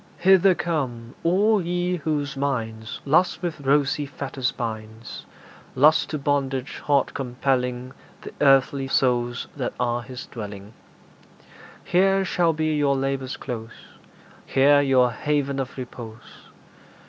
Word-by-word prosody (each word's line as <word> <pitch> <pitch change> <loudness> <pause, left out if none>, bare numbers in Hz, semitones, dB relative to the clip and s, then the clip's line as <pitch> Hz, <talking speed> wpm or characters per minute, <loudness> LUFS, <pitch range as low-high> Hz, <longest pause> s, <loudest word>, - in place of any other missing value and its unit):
Hither 190 0 +5
come, 130 -9 -3
all 200 +5 +3
ye 180 +1 -1
whose 145 -3 -2
minds 115 -5 -3
Lust 175 +6 +2
with 170 -4 -3
rosy 140 +1 +1
fetters 135 -2 -3
binds 110 -1 -7 0.5
Lust 150 +4 +4
to 155 - -2
bondage 135 -2 -1
hard 140 -2 +1
compelling 125 -1 -2 0.3
Th' - - -7
earthy 135 0 +4
souls 120 -2 0
that 130 -4 -3
are 120 -1 0
his 125 +2 -8
dwelling 105 -3 -8 1.1
Here 195 +1 +2
shall 175 -2 +2
be 155 0 0
your 145 -2 +2
labour's 135 -1 -2
close; 115 -2 -8 0.6
Here 145 +2 +5
your 130 -3 +3
haven 140 +1 -1
of 135 0 -5
repose. 120 -3 -10
135 Hz, 120 wpm, -24 LUFS, 125-150 Hz, 1.1 s, Hither